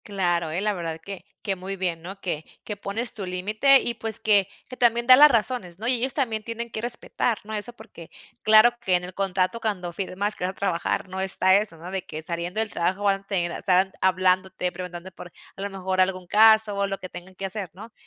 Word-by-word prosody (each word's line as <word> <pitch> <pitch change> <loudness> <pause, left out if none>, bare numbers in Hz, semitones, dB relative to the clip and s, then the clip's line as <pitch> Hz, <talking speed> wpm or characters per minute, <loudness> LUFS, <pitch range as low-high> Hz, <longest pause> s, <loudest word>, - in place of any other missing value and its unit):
Claro, 175 -5 -1
¿eh? 170 +4 -3
La 210 0 0
verdad 165 -3 -5
que 195 +3 -9 0.2
que 195 -3 -1
muy 190 +1 -6
bien, 180 -3 -3
¿no? 195 +3 -9
Que 160 -4 -3 0.2
que 210 - -5
pones 220 +4 -1
tu 200 - -5
límite 210 +9 +3
y, 240 - -1
pues, 225 -1 +5
que 205 -3 +3 0.2
que 255 - -8
también 235 0 +2
da 255 - +10
las 295 +3 +8
razones, 225 -7 0
¿no? 225 - -3
Y 255 - +4
ellos 250 +2 -1
también 225 -6 -1
tienen 230 +1 -6
que 220 - -5
respetar, 240 -1 -2
¿no? 215 +1 -8
Eso 215 +3 0
porque, 170 -7 -14 0.3
claro 215 +2 +7
que 185 -5 +1
en 180 - 0
el 180 +1 -8
contrato 190 +3 -1
cuando 190 -6 -3
firmas, 200 +3 0
que - - -7
vas 185 - 0
a - - -20
trabajar, 185 -1 -2
no 190 +1 -6
está 190 0 +4
eso, 200 -5 0
¿no? 170 +3 -9
De 190 -2 -3
que 155 - -8
saliendo 175 +4 -4
del 220 -1 -1
trabajo 185 +4 -2
van 195 -1 +1
a 195 - -32
tener 175 -4 -1
están 185 +2 +1
hablándote, 185 0 +1
preguntando 180 0 -8
por, 175 - -12 0.2
a 195 - -10
lo 200 - -3
mejor, 190 -1 -1
algún 185 -1 -1
caso, 220 +1 +5
o 200 0 0
lo 195 0 -4
que 185 - -8
tengan 185 +2 -11
que 195 - -6
hacer, 195 -1 -4
¿no? 215 +5 -12
195 Hz, 235 wpm, -24 LUFS, 180-220 Hz, 0.3 s, da